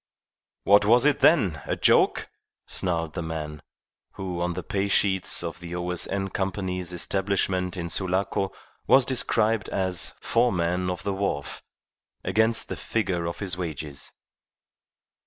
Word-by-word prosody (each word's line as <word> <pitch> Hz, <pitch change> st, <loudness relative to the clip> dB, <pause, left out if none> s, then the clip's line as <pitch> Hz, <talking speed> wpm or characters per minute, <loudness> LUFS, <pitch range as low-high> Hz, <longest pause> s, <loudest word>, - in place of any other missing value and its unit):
"What 100 Hz, +1 st, +6 dB
was 120 Hz, +5 st, +5 dB
it, 150 Hz, -1 st, +3 dB
then? 95 Hz, -, +4 dB
A -, -, 0 dB
joke?" -, -, +3 dB, 0.4 s
snarled 85 Hz, -3 st, -2 dB
the 85 Hz, -, -3 dB
man, 75 Hz, -2 st, -5 dB, 0.5 s
who 90 Hz, -3 st, -4 dB
on 90 Hz, 0 st, 0 dB
the 90 Hz, -, -4 dB
pay 100 Hz, +4 st, -1 dB
sheets 95 Hz, -3 st, +2 dB
of 85 Hz, -1 st, -5 dB
the 85 Hz, 0 st, -7 dB
O.S.N. 90 Hz, +2 st, -1 dB
Company's 95 Hz, -2 st, -2 dB
establishment 95 Hz, 0 st, 0 dB
in 85 Hz, -1 st, -3 dB
Sulaco 95 Hz, +2 st, 0 dB, 0.4 s
was 135 Hz, -1 st, +6 dB
described 115 Hz, -4 st, +1 dB
as 95 Hz, -2 st, 0 dB
"Foreman 90 Hz, -6 st, +1 dB
of 90 Hz, +1 st, -4 dB
the 100 Hz, -, -1 dB
wharf" 95 Hz, -8 st, -3 dB, 0.6 s
against 110 Hz, +4 st, +2 dB
the -, -, -4 dB
figure 90 Hz, -6 st, -2 dB
of 85 Hz, -, -4 dB
his 95 Hz, -3 st, -2 dB
wages. 75 Hz, -5 st, -5 dB
95 Hz, 135 wpm, -26 LUFS, 85-100 Hz, 0.6 s, What